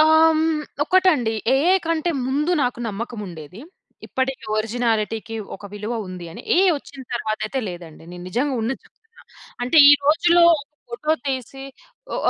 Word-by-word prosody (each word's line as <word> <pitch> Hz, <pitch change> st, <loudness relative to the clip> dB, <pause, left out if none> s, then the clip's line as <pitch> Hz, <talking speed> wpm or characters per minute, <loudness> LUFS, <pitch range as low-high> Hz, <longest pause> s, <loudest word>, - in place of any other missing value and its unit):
ఆహ్, 315 Hz, 0 st, +6 dB, 0.3 s
హ్మ్. 315 Hz, -, +1 dB, 0.4 s
ఒకటండి. 315 Hz, -12 st, +3 dB, 0.2 s
ఏఐ 340 Hz, +8 st, +4 dB
కంటే 330 Hz, +1 st, 0 dB, 0.2 s
ముందు 295 Hz, +6 st, 0 dB
నాకు 245 Hz, -2 st, -1 dB
నమ్మకముండేది. 200 Hz, -5 st, -7 dB, 0.5 s
ఇప్పటికి 260 Hz, -2 st, -3 dB
ఒరిజినాలిటీకి 225 Hz, 0 st, -1 dB, 0.2 s
ఒక 205 Hz, -, -16 dB
విలువ 210 Hz, +3 st, -5 dB, 0.2 s
ఉంది 180 Hz, -2 st, -8 dB
అని. -, -, -10 dB
ఏఐ 380 Hz, +1 st, +5 dB
ఒచ్చిన 275 Hz, -1 st, -12 dB
తర్వాతయితే 220 Hz, +3 st, -3 dB
లేదండి. 170 Hz, -3 st, -10 dB
నేను 175 Hz, 0 st, -9 dB
నిజంగా 260 Hz, +8 st, -1 dB
ఉన్నది 260 Hz, +4 st, -3 dB
జెప్తున్నా. 455 Hz, +3 st, -23 dB, 0.4 s
అంటే, 255 Hz, +6 st, 0 dB
ఈ -, -, +9 dB
రోజుల్లో 340 Hz, +4 st, +4 dB
ఒక 290 Hz, -, -4 dB, 0.3 s
ఫోటో 300 Hz, +6 st, -1 dB, 0.2 s
తీసి 270 Hz, 0 st, -4 dB, 0.5 s
ఓహ్! -, -, -3 dB
250 Hz, 140 wpm, -22 LUFS, 215-310 Hz, 0.5 s, ఈ